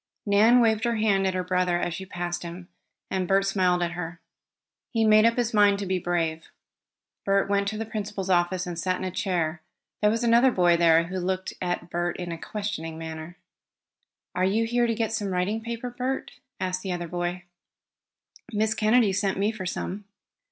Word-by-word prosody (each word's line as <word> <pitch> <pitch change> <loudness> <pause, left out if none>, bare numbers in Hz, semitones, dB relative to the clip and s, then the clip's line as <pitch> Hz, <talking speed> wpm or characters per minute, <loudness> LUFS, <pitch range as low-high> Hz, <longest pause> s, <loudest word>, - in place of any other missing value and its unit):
Nan 220 +4 +5
waved 220 -1 +2
her 235 -1 +1
hand 200 -3 +2
at 190 - -1
her 185 - -1
brother 180 -1 +1
as 175 - -2
she 190 +3 -7
passed 175 -1 -4
him, 175 +1 -8 0.4
and 185 -1 -1
Bert 195 +1 +3
smiled 185 -2 +2
at 170 - -1
her. 170 0 -6 0.7
He 225 -1 +1
made 215 0 +6
up 230 +1 +3
his 240 -2 0
mind 205 -1 +5
to 200 - -4
be 185 0 0
brave. 165 -2 -1 0.8
Bert 195 0 +2
went 200 0 +1
to 215 +1 -2
the 225 - -3
principal's 210 -3 -4
office, 175 +1 +2
and 175 -1 -5
sat 185 +1 0
in - - -6
a 185 - -2
chair. 175 -4 -1 0.4
There 210 - +5
was 225 +3 0
another 235 +2 +5
boy 175 -7 +3
there, 165 -1 +5
who 185 +2 -4
looked 185 +1 -2
at 175 -1 -3
Bert 175 0 -1
in 175 -1 -5
a 165 - -4
questioning 200 -7 -4
manner. 160 +1 -7 1.0
"Are 180 - 0
you 210 +5 +2
here 240 +1 +1
to 230 - 0
get 225 -1 -1
some 210 -2 -2
writing 190 +4 -1
paper, 235 +2 -5
Bert?" 255 +2 -3 0.3
asked 185 0 -2
the 190 -2 -3
other 175 -1 -4
boy. 175 +1 -3 1.1
"Miss 215 0 +1
Kennedy 220 -1 +3
sent 195 -1 0
me 205 +2 +1
for 200 -5 -6
some." 195 +3 -4
190 Hz, 195 wpm, -26 LUFS, 175-215 Hz, 1.1 s, made